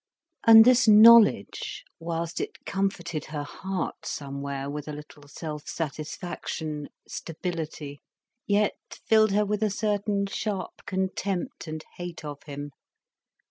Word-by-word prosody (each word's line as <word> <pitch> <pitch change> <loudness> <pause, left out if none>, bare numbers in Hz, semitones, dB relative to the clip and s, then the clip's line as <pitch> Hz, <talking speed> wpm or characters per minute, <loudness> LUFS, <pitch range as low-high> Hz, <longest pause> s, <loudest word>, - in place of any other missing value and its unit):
And 225 -1 +10
this 250 -1 +5
knowledge, 225 - +6 0.2
whilst 165 0 -3
it - - -7
comforted 175 -5 -2
her 150 -1 -4
heart 190 +4 -5
somewhere 140 -1 -4
with 145 +1 -5
a 150 - -5
little 150 0 -11
self 150 0 -7
satisfaction, 155 -1 -5 0.2
stability, 160 -4 -5 0.5
yet 205 0 +2 0.3
filled 215 -1 +5
her 210 +1 +3
with 210 +1 -1
a 215 - +2
certain 205 0 0
sharp 195 -2 -4
contempt 190 -1 -2
and 155 0 -6
hate 175 -3 -6
of 145 -1 -7
him. 145 0 -6
170 Hz, 120 wpm, -27 LUFS, 150-205 Hz, 0.5 s, And